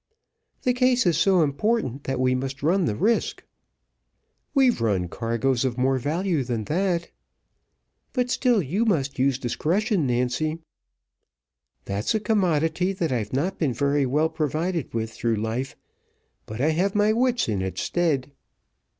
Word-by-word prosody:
"The 250 Hz, -, +2 dB
case 250 Hz, -1 st, +2 dB
is 175 Hz, -3 st, +3 dB
so 180 Hz, +1 st, +4 dB
important, 145 Hz, -, -1 dB
that 135 Hz, -1 st, -2 dB
we 130 Hz, 0 st, +2 dB
must 135 Hz, +1 st, -4 dB
run 180 Hz, +4 st, +2 dB
the 105 Hz, -, -1 dB
risk." 225 Hz, -, 0 dB, 1.1 s
"We've 260 Hz, -, +3 dB
run 100 Hz, -6 st, +1 dB
cargoes 115 Hz, +5 st, 0 dB
of 130 Hz, -2 st, -1 dB
more 130 Hz, +1 st, +2 dB
value 160 Hz, +3 st, 0 dB
than 120 Hz, -3 st, -3 dB
that." 175 Hz, -, -1 dB, 1.0 s
"But 250 Hz, -2 st, -1 dB
still 245 Hz, -8 st, +2 dB
you 180 Hz, -, 0 dB
must 145 Hz, -, 0 dB
use 135 Hz, -1 st, +2 dB
discretion, 170 Hz, -, 0 dB
Nancy." 125 Hz, +6 st, 0 dB, 1.3 s
"That's 100 Hz, -, -1 dB
a -, -, +2 dB
commodity 180 Hz, -4 st, +1 dB
that 170 Hz, -5 st, -2 dB
I've 110 Hz, -5 st, -2 dB
not 170 Hz, +9 st, -1 dB
been 145 Hz, -7 st, +1 dB
very 140 Hz, +1 st, +1 dB
well 150 Hz, +5 st, +2 dB
provided 160 Hz, +2 st, -2 dB
with 110 Hz, -1 st, -3 dB
through 115 Hz, 0 st, -1 dB
life; 110 Hz, +5 st, -3 dB, 0.7 s
but 110 Hz, +2 st, -7 dB
I 145 Hz, +5 st, +2 dB
have 185 Hz, +5 st, 0 dB
my 210 Hz, +1 st, +3 dB
wits 245 Hz, +1 st, +1 dB
in 105 Hz, -4 st, -1 dB
its 95 Hz, 0 st, -3 dB
stead." 150 Hz, -6 st, 0 dB
150 Hz, 150 wpm, -24 LUFS, 125-190 Hz, 1.3 s, so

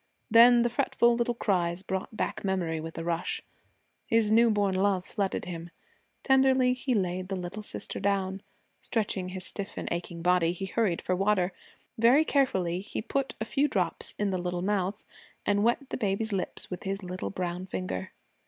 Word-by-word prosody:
Then 235 Hz, +1 st, +8 dB
the 240 Hz, -, +2 dB
fretful 240 Hz, 0 st, +3 dB
little 240 Hz, 0 st, 0 dB
cries 180 Hz, -4 st, 0 dB
brought 190 Hz, +3 st, -4 dB
back -, -, -2 dB
memory 180 Hz, -5 st, -1 dB
with 160 Hz, +1 st, -7 dB
a 165 Hz, -, -3 dB
rush. 170 Hz, 0 st, -2 dB, 0.6 s
His 225 Hz, -2 st, +3 dB
new 230 Hz, +1 st, +6 dB
born 205 Hz, -3 st, +2 dB
love 190 Hz, -1 st, +1 dB
flooded 195 Hz, -2 st, -2 dB
him. 170 Hz, -1 st, -6 dB, 0.5 s
Tenderly 265 Hz, -1 st, +4 dB
he 255 Hz, 0 st, -1 dB
laid 185 Hz, -2 st, -1 dB
the 195 Hz, -, -3 dB
little 180 Hz, +3 st, -5 dB
sister 210 Hz, -, -5 dB
down. 195 Hz, -1 st, 0 dB, 0.4 s
Stretching 205 Hz, -5 st, -1 dB
his 185 Hz, 0 st, -4 dB
stiff 200 Hz, -1 st, -5 dB
and -, -, -4 dB
aching 170 Hz, -1 st, -4 dB
body, 175 Hz, -1 st, +3 dB
he 185 Hz, +2 st, -5 dB
hurried 190 Hz, -3 st, 0 dB
for 185 Hz, -, 0 dB
water. 195 Hz, -1 st, +1 dB, 0.5 s
Very 250 Hz, +7 st, +6 dB
carefully 190 Hz, -, +1 dB
he 200 Hz, -, -5 dB
put 275 Hz, +4 st, -2 dB
a 220 Hz, -, -2 dB
few 275 Hz, +5 st, +1 dB
drops -, -, -1 dB
in 205 Hz, -1 st, 0 dB
the 185 Hz, -, -1 dB
little 175 Hz, 0 st, -2 dB
mouth 200 Hz, 0 st, -1 dB, 0.4 s
and 205 Hz, 0 st, +2 dB
wet 240 Hz, +4 st, +1 dB
the -, -, -1 dB
baby's 215 Hz, 0 st, -1 dB
lips 190 Hz, 0 st, -4 dB
with 180 Hz, -, -5 dB
his 195 Hz, 0 st, -3 dB
little 185 Hz, 0 st, -4 dB
brown 180 Hz, 0 st, -4 dB
finger. 185 Hz, 0 st, -4 dB
195 Hz, 180 wpm, -28 LUFS, 180-225 Hz, 0.6 s, Then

